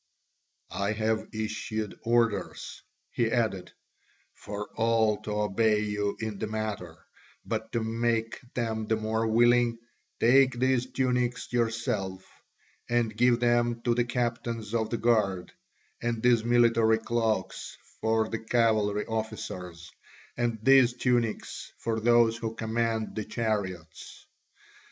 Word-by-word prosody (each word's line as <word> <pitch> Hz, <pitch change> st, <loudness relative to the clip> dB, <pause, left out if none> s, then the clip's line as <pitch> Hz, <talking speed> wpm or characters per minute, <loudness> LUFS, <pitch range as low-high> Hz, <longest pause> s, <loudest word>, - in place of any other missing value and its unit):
"I 100 Hz, +2 st, -1 dB
have 110 Hz, 0 st, -1 dB
issued 110 Hz, -1 st, -4 dB
orders," 115 Hz, -2 st, 0 dB, 0.3 s
he 115 Hz, -2 st, 0 dB
added, 110 Hz, -6 st, -1 dB, 0.6 s
"for 105 Hz, 0 st, -6 dB
all 110 Hz, -2 st, +2 dB
to -, -, -7 dB
obey 105 Hz, +1 st, +2 dB
you 105 Hz, -1 st, -2 dB
in 110 Hz, -3 st, -4 dB
the 110 Hz, -, -2 dB
matter, 105 Hz, -6 st, -5 dB, 0.4 s
but -, -, -3 dB
to 115 Hz, -, 0 dB
make 115 Hz, 0 st, -1 dB, 0.2 s
them 110 Hz, -3 st, -2 dB
the 110 Hz, -, +2 dB
more 110 Hz, +1 st, -1 dB
willing, 120 Hz, +1 st, +4 dB, 0.4 s
take 130 Hz, +1 st, +5 dB
these 130 Hz, 0 st, +1 dB
tunics 125 Hz, -2 st, -1 dB
yourself 115 Hz, -5 st, -1 dB, 0.6 s
and 120 Hz, -2 st, +1 dB
give 120 Hz, +1 st, +3 dB
them 120 Hz, -1 st, +2 dB
to 120 Hz, -, +2 dB
the 120 Hz, +1 st, +2 dB
captains 115 Hz, -2 st, -3 dB
of 110 Hz, -2 st, 0 dB
the 115 Hz, -, -1 dB
guard, 105 Hz, -6 st, +1 dB, 0.5 s
and 115 Hz, -1 st, -2 dB
these 120 Hz, -2 st, +4 dB
military 115 Hz, -2 st, +4 dB
cloaks 115 Hz, -3 st, -2 dB, 0.2 s
for 110 Hz, 0 st, +1 dB
the 115 Hz, -, -4 dB
cavalry 110 Hz, -3 st, +1 dB
officers, 95 Hz, -6 st, -5 dB, 0.4 s
and 120 Hz, -1 st, -1 dB
these 130 Hz, -1 st, +6 dB
tunics 120 Hz, -3 st, -1 dB
for 115 Hz, -1 st, -2 dB
those 115 Hz, 0 st, +4 dB
who 115 Hz, -1 st, -4 dB
command 115 Hz, -1 st, -1 dB
the 110 Hz, -, -2 dB
chariots." 100 Hz, -8 st, -4 dB
115 Hz, 125 wpm, -28 LUFS, 110-120 Hz, 0.6 s, these